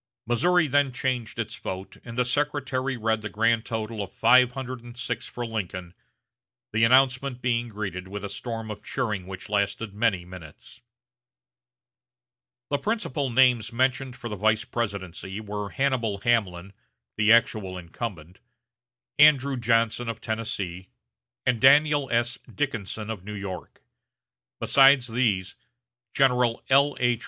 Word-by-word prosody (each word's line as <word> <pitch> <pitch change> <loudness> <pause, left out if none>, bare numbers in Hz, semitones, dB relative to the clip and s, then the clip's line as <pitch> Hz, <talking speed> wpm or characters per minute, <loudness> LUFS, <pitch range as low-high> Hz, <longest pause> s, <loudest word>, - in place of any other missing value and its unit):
Missouri 165 +9 +3
then 140 0 +2
changed 125 -2 -3
its - - -3
vote, 95 +1 -7
and 115 0 -9
the 125 - +2
secretary 135 -1 -1
read 110 -1 0
the 105 - -5
grand 115 +1 +1
total 110 -1 -4
of 100 - -6
five 125 +2 +5
hundred 130 -2 -6
and 120 0 -12
six 120 -1 -4
for 120 - -5
Lincoln; 90 -6 -5 0.8
the 110 +1 +2
announcement 130 +1 +3
being 120 -1 -1
greeted 95 -4 -5
with 100 +1 -7
a - - -2
storm 115 -1 -5
of 105 - -8
cheering 105 -8 -3
which 95 -1 -7
lasted 105 +1 -1
many 100 -5 0
minutes. 90 -4 -12 1.9
The 145 - +1
principal 155 - -2
names 125 -2 +3
mentioned 130 +1 0
for 120 - -7
the 105 - -4
vice 110 +2 +1
presidency 100 -3 -4
were 105 -1 -5
Hannibal 130 -6 0
Hamlin, 100 -6 0 0.4
the 105 +1 +3
actual 110 -5 +3
incumbent; 90 -1 -7 0.8
Andrew 140 -2 +6
Johnson 115 0 +1
of 115 -1 -5
Tennessee; 100 -5 -4 0.6
and 125 -3 +1
Daniel 145 0 +5
S. 120 +2 0
Dickinson 110 -6 -3
of 100 -5 -7
New 105 +1 -7
York. 100 -3 -7 0.8
Besides 135 -2 +5
these, 110 -6 0 0.6
General 125 -3 +2
L.H. 130 -4 +3
115 Hz, 135 wpm, -26 LUFS, 105-130 Hz, 1.9 s, Andrew